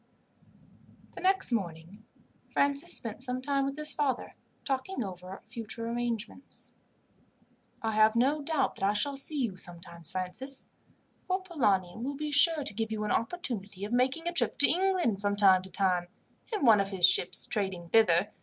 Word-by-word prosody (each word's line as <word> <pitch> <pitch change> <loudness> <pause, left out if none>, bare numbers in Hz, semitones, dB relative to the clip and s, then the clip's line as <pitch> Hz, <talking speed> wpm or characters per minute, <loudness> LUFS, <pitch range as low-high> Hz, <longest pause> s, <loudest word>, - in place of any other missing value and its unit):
The - - -10
next 380 -5 +1
morning 185 -1 -4 0.5
Francis 280 0 +2
spent 225 0 -3
some 255 -1 +2
time 275 +1 0
with 275 +1 -4
his 305 0 +2
father 275 -4 -2 0.3
talking 270 +2 -2
over 185 -1 -9
future 230 0 -5
arrangements. 235 +1 -5 1.1
"I 225 - 0
have 215 +1 +4
no 275 +6 +2
doubt 310 +1 0
that - - -7
I 200 +1 +3
shall 275 +7 0
see 280 +2 +1
you 220 -8 -2
sometimes, 170 -2 -3
Francis; 220 +9 -3 0.5
for 370 +1 -1
Polani 205 - 0
will 265 +5 -4
be 300 +1 -4
sure 300 +1 +3
to 210 - -4
give 220 +1 -3
you 215 -1 -3
an 210 - -2
opportunity 215 - -3
of 215 - -6
making 260 +7 +1
a 345 - -1
trip 345 - +2
to 285 - +7
England, 355 - +1
from 205 0 0
time 195 -2 +5
to 190 - -12
time, 180 -2 0 0.4
in 420 -10 -1
one 220 -3 +6
of 195 - -3
his 190 -3 +3
ships 180 0 +3
trading 190 -5 -1
thither. 205 -2 +3
230 Hz, 170 wpm, -29 LUFS, 195-280 Hz, 1.1 s, to